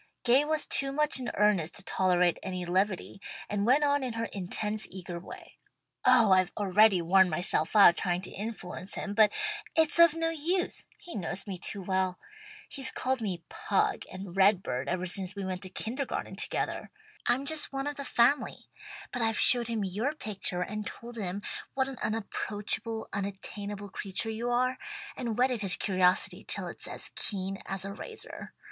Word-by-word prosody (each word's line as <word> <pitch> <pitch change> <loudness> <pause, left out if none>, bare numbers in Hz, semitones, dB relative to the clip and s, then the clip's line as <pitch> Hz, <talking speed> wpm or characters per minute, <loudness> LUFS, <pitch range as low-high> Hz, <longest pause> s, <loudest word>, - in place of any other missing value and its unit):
Gay 255 +4 +5
was 310 0 0
too 275 0 +2
much 300 -1 +2
in 250 - -3
earnest 200 -6 +2
to - - -5
tolerate 180 -2 +2
any 185 -2 -4
levity, 190 +2 0 0.3
and 205 +1 -1
went 275 +4 +5
on 285 0 +3
in 255 -3 -2
her 230 0 -2
intense 210 +3 -1
eager 180 -2 -6
way. 175 - -12 0.4
"Oh 250 -5 +6
I've 185 0 +4
already 200 -2 +4
worn 190 +2 +5
myself 160 +1 0
out 195 -4 +8
trying 175 -1 0
to - - -7
influence 200 -3 -6
him, 205 - -4
but 215 0 +5 0.4
it's 320 +1 +4
of 335 -2 +8
no 330 0 0
use. 340 +4 -1
He 345 - -10
knows 190 0 -3
me 190 -3 -5
too 195 +2 -3
well. 185 -1 0 0.5
He's 270 -2 -5
called 260 -1 -1
me 185 -6 -3
'Pug' 200 - 0
and 185 -1 -8
'Red 195 0 +5
bird' 125 +2 -3
ever 185 0 -1
since 185 +1 -1
we 200 -1 -4
went 185 0 -3
to 190 - -4
kindergarten 255 +8 -3
together. - - -3 0.4
I'm 250 +3 +2
just 310 +1 +1
one 270 0 -3
of 290 0 -3
the 280 - -4
family. 260 +2 +1 0.4
But 245 - -3
I've 225 -1 +1
showed 240 -2 +4
him 225 -3 -1
your 215 +11 -1
picture 195 -8 -3
and 210 +3 -4
told 240 +1 -8
him 200 -2 -4 0.3
what 265 -1 +1
an 270 -2 -7
unapproachable, 220 +1 -2
unattainable 200 +1 -5
creature 200 +3 -1
you 230 +2 -2
are, 255 +1 +1 0.4
and 235 -4 -3
whetted 250 -2 +2
his 195 -3 +2
curiosity 185 -2 +1
till - - -3
it's - - -3
as - - -5
keen 195 -1 -2
as 195 0 -3
a 200 - -5
razor. 445 - -9
210 Hz, 180 wpm, -30 LUFS, 185-250 Hz, 0.5 s, out